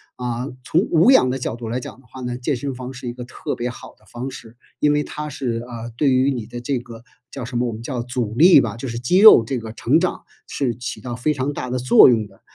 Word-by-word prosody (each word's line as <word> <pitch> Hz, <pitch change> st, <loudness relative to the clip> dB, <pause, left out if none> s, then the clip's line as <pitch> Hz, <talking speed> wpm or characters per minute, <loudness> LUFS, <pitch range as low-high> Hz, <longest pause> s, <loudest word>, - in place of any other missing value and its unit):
啊。 125 Hz, +1 st, -4 dB, 0.2 s
从 155 Hz, -, +1 dB
无 170 Hz, +8 st, +5 dB
氧 130 Hz, -, +5 dB
的 135 Hz, -, -3 dB
角 120 Hz, -, -3 dB
度 120 Hz, -1 st, -7 dB
来 120 Hz, +3 st, -2 dB
讲 125 Hz, -, -10 dB
的 130 Hz, -, -22 dB
话 130 Hz, +3 st, -11 dB
呢， 125 Hz, 0 st, -4 dB
健 130 Hz, +3 st, -1 dB
身 135 Hz, +2 st, -4 dB
房 130 Hz, +1 st, -7 dB
是 130 Hz, -1 st, -8 dB
一 120 Hz, -, -4 dB
个 125 Hz, 0 st, -8 dB
特 120 Hz, -, -5 dB
别 120 Hz, -, -3 dB
好 -, -, -12 dB
的 -, -, -27 dB
方 125 Hz, +3 st, -6 dB
式， 115 Hz, -3 st, -12 dB, 0.2 s
因 150 Hz, 0 st, +3 dB
为 150 Hz, 0 st, +1 dB
它 150 Hz, 0 st, -6 dB
是， 135 Hz, -5 st, -3 dB
呃， 120 Hz, -1 st, -7 dB
对 140 Hz, -3 st, +2 dB
于 130 Hz, +2 st, +3 dB
你 120 Hz, -5 st, -4 dB
的 120 Hz, +1 st, -8 dB
这 135 Hz, +1 st, -1 dB
个 115 Hz, -1 st, -10 dB, 0.3 s
叫 135 Hz, -, -6 dB
什 120 Hz, 0 st, -4 dB
么， 125 Hz, -, 0 dB
我 115 Hz, -, -4 dB
们 110 Hz, -, -8 dB
叫 120 Hz, -1 st, -4 dB
阻 120 Hz, -3 st, -3 dB
力 165 Hz, 0 st, +7 dB
吧， 115 Hz, -2 st, -4 dB
就 130 Hz, +3 st, -6 dB
是 115 Hz, 0 st, -4 dB
肌 150 Hz, +10 st, +1 dB
肉 215 Hz, -, +9 dB
这 125 Hz, +3 st, -3 dB
个 110 Hz, -1 st, -7 dB
成 140 Hz, +8 st, +2 dB
长， 180 Hz, -, -2 dB, 0.2 s
是 125 Hz, -5 st, -2 dB
起 125 Hz, +3 st, -6 dB
到 120 Hz, -1 st, -5 dB
非 150 Hz, +5 st, 0 dB
常 135 Hz, +1 st, -2 dB
大 125 Hz, -3 st, -5 dB
的 125 Hz, -, -1 dB
作 125 Hz, +1 st, +7 dB
用 110 Hz, -3 st, +1 dB
的。 95 Hz, -1 st, -23 dB
125 Hz, 295 characters per minute, -21 LUFS, 120-135 Hz, 0.3 s, 肉